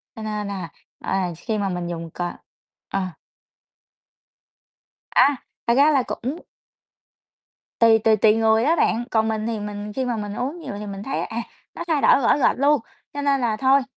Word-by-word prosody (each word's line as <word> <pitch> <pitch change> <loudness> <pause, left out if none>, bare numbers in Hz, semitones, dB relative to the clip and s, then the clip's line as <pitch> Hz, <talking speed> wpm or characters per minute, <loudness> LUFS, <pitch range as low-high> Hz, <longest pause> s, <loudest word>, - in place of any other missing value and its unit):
cho 220 - -8
nên 210 -1 -3
là, 190 -4 -5 0.3
ờ, 190 - 0 0.2
khi 215 +4 -3
mà 200 -1 -1
mình 175 -1 -3
dùng 165 -1 -5
c - - -18 0.7
ờ. 195 - -1 2.1
À, 275 +2 +5 0.3
thật 235 - +4
ra 290 +3 +5
là 270 -4 +3
cũng 270 +9 -4 1.4
tùy 225 -1 +6
tùy 220 0 +4
tùy 215 +1 +5
người 225 0 +3
đó 320 +4 +3
bạn, 240 -6 +1
còn 220 -1 +2
mình 220 0 -2
thì 225 -2 -2
mình 205 0 -6
khi 260 -1 -1
mà 240 -2 -1
mình 205 -1 -4
uống 280 +10 -3
nhiều 285 -9 -6
thì 210 - -6
mình 200 0 -6
thấy 270 - -2
à, 225 - -5 0.4
nó 340 - -4
thay 310 -4 +1
đổi - - +6
rõ 260 - +4
rệt 270 - +2
luôn, 285 -2 +4 0.3
cho 285 - -3
nên 280 -2 +2
là 220 -3 0
thôi, 270 +2 +4
225 Hz, 190 wpm, -23 LUFS, 210-270 Hz, 2.1 s, tùy